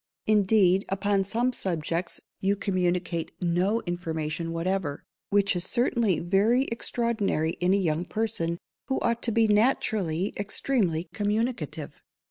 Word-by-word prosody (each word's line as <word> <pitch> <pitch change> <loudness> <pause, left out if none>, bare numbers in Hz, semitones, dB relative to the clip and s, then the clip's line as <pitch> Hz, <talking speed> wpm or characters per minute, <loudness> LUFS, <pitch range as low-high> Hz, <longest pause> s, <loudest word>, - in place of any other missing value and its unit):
_ - - -66 0.2
Indeed, 200 -3 +4
upon 200 0 +1
some 235 +6 0
subjects, 170 -3 -2 0.2
you 195 +1 +1
communicate 180 -4 -1
no 180 +6 +1
information 165 -2 -3
whatever, 165 -3 -2 0.3
which 200 -1 +3
is 175 - -1
certainly 235 -3 +1
very 200 +9 +3
extraordinary 230 -9 0
in 180 +1 +2
a - - +3
young 170 -3 0
person, 170 -7 -1 0.3
who 265 - 0
ought 235 0 0
to 235 - +1
be 225 0 +3
naturally 210 -5 +1
extremely 200 -5 0
communicative. 220 +4 -2
195 Hz, 125 wpm, -27 LUFS, 175-220 Hz, 0.3 s, Indeed